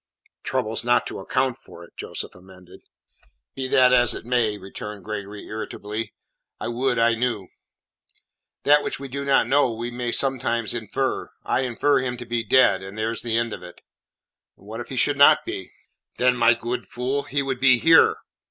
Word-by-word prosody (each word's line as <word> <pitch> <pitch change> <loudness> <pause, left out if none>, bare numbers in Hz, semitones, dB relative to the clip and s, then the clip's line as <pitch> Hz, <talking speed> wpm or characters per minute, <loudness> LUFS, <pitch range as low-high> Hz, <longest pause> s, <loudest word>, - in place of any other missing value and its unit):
"Troubles 110 +2 -2
not 120 0 +2
to - - -6
account 130 +5 -1
for 85 - -14
it," 85 - -17
Joseph - - -6
amended. 90 0 -16 0.7
"Be 130 -1 -3
that 130 -1 +5
as 120 -2 +4
it - - -8
may," 120 -4 +1
returned 100 0 -8
Gregory 105 -1 -6
irritably, 110 0 -5 0.5
"I - - -4
would 125 +1 0
I 115 0 +4
knew." 115 -5 -2 1.1
"That 145 +1 +5
which - - -4
we 140 - -6
do 140 +2 -5
not 140 -1 +3
know 140 -2 +3
we 115 +2 -5
may 120 0 -3
sometimes 120 -5 0
infer. 120 +3 -2 0.2
I - - +1
infer 130 +3 +1
him 125 -1 -3
to 120 - -8
be 120 -1 -2
dead, 110 -4 +4
and 95 +2 -9
there's 110 +1 -1
the 115 -1 0
end 115 -1 -1
of - - -7
it." 90 -1 -12 0.8
"What - - -9
if - - -7
he - - -5
should - - +2
not - - +7
be?" - - -6 0.5
"Then, 125 0 +3
my 115 -1 +4
good 120 +2 -4
fool, 130 +3 -2
he 140 +1 -2
would 135 -2 -3
be 130 -1 +5
here." 165 +5 +6
120 Hz, 180 wpm, -23 LUFS, 110-130 Hz, 1.1 s, not